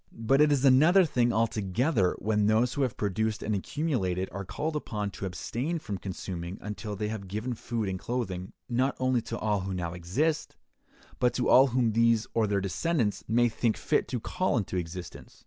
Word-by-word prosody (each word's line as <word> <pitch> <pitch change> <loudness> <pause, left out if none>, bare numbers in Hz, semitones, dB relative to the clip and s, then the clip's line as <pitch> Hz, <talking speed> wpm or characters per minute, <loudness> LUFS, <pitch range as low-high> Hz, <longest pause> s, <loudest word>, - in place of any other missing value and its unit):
But 115 +5 +2
it 150 0 +5
is 140 -1 +2
another 155 +8 +6
thing 120 -6 +2
altogether 110 - +1
when 105 -1 +1
those 115 +3 +3
who 145 - -2
have 130 -4 0
produced 110 +2 -1
and 110 - -1
accumulated 95 - -1
are 100 - -5
called 145 - -3
upon 105 -8 -3
to 95 - -5
abstain 125 - -3
from 105 - -5
consuming 90 -1 -5
until 105 0 -5
they 105 +1 -2
have 105 -3 -5
given 110 +6 -3
food 115 -2 -3
and 95 -1 -3
clothing, 95 -7 -3 0.2
not 130 +3 +1
only 130 -2 +2
to - - -5
all 105 -2 0
who 95 0 -4
now 85 -2 -3
exist, 120 - -1 0.6
but 125 -1 +2
to 125 - 0
all 135 +2 +7
whom 120 -2 +1
these 115 0 +3
or 115 -2 +2
their 100 -1 +1
descendants 115 - -1
may 120 +2 +3
think 115 -1 0
fit - - +1
to 125 - -2
call 185 +7 -1
into 100 -4 -2
existence. 90 0 -6
110 Hz, 190 wpm, -28 LUFS, 100-130 Hz, 0.6 s, all